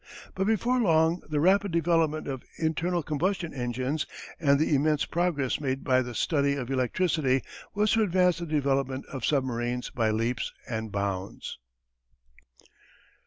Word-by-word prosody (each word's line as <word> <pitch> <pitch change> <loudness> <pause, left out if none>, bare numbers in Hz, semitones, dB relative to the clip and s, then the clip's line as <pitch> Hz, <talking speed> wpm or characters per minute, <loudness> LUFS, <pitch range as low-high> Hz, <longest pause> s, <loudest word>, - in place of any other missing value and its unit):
But 190 +1 -1
before 235 +4 +2
long 165 -4 +3
the 150 -1 0
rapid 195 +4 +3
development 165 -2 +1
of 135 -3 -4 0.2
internal 165 +2 0
combustion 170 +4 -1
engines 130 +3 -2 0.3
and 140 -3 +4
the 155 - +2
immense 150 +1 +2
progress 160 -7 0
made 135 -1 -2
in 130 -1 +4
the 120 -1 -7
study 140 +2 +1
of 130 -2 -4
electricity 135 0 +1 0.3
was 210 +1 +2
to 225 - +3
advance 180 -3 +3
the 170 - -5
development 135 -3 0
of 130 -3 -6
submarines 125 -3 -1
by 115 -3 +1
leaps 115 +3 -1
and 110 -3 -4
bounds. 100 -1 -4
145 Hz, 140 wpm, -28 LUFS, 130-170 Hz, 0.3 s, and